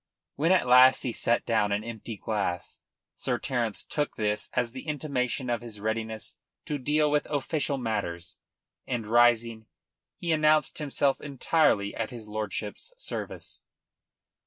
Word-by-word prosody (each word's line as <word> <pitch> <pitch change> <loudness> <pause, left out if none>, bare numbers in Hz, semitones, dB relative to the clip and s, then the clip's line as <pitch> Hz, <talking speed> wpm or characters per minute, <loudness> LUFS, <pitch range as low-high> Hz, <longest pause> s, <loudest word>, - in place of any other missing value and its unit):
When 160 +5 +2
at 185 - +4
last 125 +1 +7
he 125 - -1
set 120 +1 +1
down 110 -3 +2
an 105 +1 0
empty 115 -1 -7
glass 100 -5 -3 0.3
Sir - - -1
Terence 120 -5 -2
took 150 -1 -2
this 105 -1 -1
as 120 -1 0
the 130 +5 -9
intimation 140 -4 -1
of 120 -1 0
his 115 -3 -7
readiness 110 +1 -3 0.3
to 145 -1 -2
deal 150 +3 +2
with 150 0 +1
official 145 0 -1
matters, 100 -8 -3 0.5
and, 120 -3 -2
rising, 115 -1 +3 0.5
he 170 - -2
announced 155 -1 +3
himself 140 -2 +1
entirely 140 -7 +2
at 115 - -3
his 115 -4 -8
lordship's 105 - -4
service. - - -5
120 Hz, 140 wpm, -28 LUFS, 110-145 Hz, 0.5 s, last